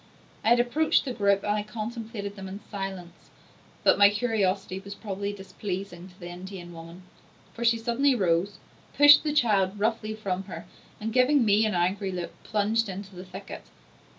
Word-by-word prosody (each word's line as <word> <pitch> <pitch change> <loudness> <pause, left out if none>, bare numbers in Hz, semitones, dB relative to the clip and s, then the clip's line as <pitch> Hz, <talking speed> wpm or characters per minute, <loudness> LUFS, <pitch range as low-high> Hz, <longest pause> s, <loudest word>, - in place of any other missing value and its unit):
I - - +2
had 240 +1 +5
approached 290 +7 +2
the 255 - -3
group, 200 -3 +2
and 205 - 0
I 210 - 0
contemplated 215 -1 -6
them 195 -1 -8
in 190 +2 -7
silence; 190 -4 -7 0.5
but - - +4
my 200 0 +8
curiosity 205 -4 -1
was 200 +1 -9
probably 200 -1 -4
displeasing 190 -2 -6
to 180 +2 -21
the 175 - -8
Indian 180 -1 -9
woman, 165 +2 -11 0.5
for 235 - -5
she 230 0 +4
suddenly 245 +4 +2
rose, 185 -1 +1 0.4
pushed 290 0 +8
the 305 - 0
child 210 -9 +2
roughly 215 0 -1
from 195 -3 -3
her, 185 - -8 0.3
and 220 +1 -4
giving 255 +1 +4
me 215 +1 +4
an 210 - -1
angry 190 +3 0
look 175 -2 -4
plunged 215 +1 0
into 195 0 -7
the 180 - -8
thicket. 190 +2 -9
200 Hz, 175 wpm, -27 LUFS, 190-225 Hz, 0.5 s, my